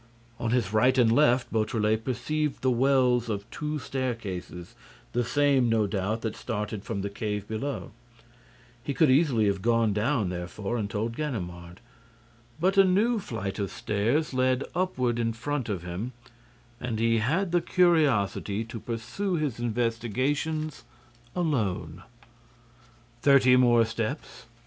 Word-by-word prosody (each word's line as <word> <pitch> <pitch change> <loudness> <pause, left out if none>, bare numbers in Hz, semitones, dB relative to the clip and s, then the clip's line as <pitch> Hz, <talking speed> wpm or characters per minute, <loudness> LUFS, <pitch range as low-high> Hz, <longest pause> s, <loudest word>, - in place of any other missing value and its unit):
On 115 - -1
his 115 -4 0
right 125 +4 +4
and 120 -3 +5
left, 125 -2 +3
Beautrelet 110 0 +1
perceived 135 +5 -2
the 130 - +3
wells 125 -1 +3
of 100 -2 -3
two 150 0 -3
staircases, 115 - -5 0.4
the 120 +1 0
same, 135 0 +2
no 110 -2 +2
doubt, 105 +2 -2
that 110 -2 -3
started 105 -2 -4
from 110 -4 -3
the 100 - -2
cave 105 -1 -3
below. 120 +6 -4 0.9
He 140 0 -3
could 145 0 +4
easily 130 -6 +3
have 100 -2 0
gone 115 -1 +2
down, 110 -1 0
therefore, 90 +5 -4
and 105 -4 -2
told 110 +3 -2
Ganimard. 90 - -5 0.8
But 190 +4 +3
a - - +9
new 210 +5 +2
flight 100 - -5
of 100 -2 -1
stairs 115 +10 -1
led 130 0 +2
upward 130 -10 0
in 115 -1 0
front 130 +1 -3
of 95 -5 -3
him 90 +8 -5 0.7
and 125 -3 -3
he 115 0 +2
had 165 - 0
the 175 0 +3
curiosity 140 - +2
to 115 0 -8
pursue 120 - -3
his 150 -8 -2
investigations 125 +7 -1 0.5
alone. 140 - -1 1.2
Thirty 135 -2 +6
more 120 -2 +5
steps. 115 +4 -5
120 Hz, 140 wpm, -27 LUFS, 110-140 Hz, 1.2 s, a